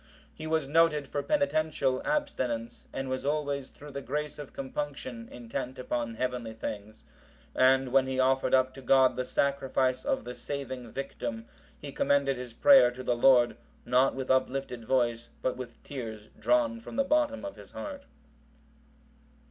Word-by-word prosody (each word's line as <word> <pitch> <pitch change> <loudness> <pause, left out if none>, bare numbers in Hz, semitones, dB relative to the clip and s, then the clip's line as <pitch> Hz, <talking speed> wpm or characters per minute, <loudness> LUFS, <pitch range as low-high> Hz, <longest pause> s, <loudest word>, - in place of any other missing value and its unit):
He 155 - -7
was 160 -3 0
noted 150 -1 +3
for 145 - -2
penitential 155 - +1
abstinence, 130 - -2
and 135 0 -4
was 130 0 -2
always 145 -2 -1
through 145 0 -12
the 140 0 -5
grace 150 +3 -3
of 145 - -8
compunction, 130 -4 -5
intent 125 +2 -5
upon 120 -2 -3
heavenly 125 -2 -3
things. 110 -1 -7 0.5
And 130 0 +4
when 130 0 +4
he 130 0 -2
offered 130 0 +3
up 130 0 +2
to 135 - -10
God 130 0 +4
the 125 - -2
Sacrifice 130 -2 +1
of - - 0
the 125 - -6
saving 130 -3 -5
Victim, 115 -3 -5 0.3
he 145 - -8
commended 140 0 +2
his 125 -1 -7
prayer 180 -4 +7
to 125 +1 -8
the 120 - +1
Lord, 120 0 +5 0.3
not 125 +2 +3
with 130 -1 -2
uplifted 130 -2 0
voice, 120 -2 +1
but 130 - 0
with 120 -2 -7
tears 110 -6 -7
drawn 290 -6 +2
from 230 - -10
the 275 - +3
bottom 295 0 +1
of 295 - -6
his - - -13
heart. 285 -2 -7
130 Hz, 160 wpm, -29 LUFS, 125-145 Hz, 0.5 s, prayer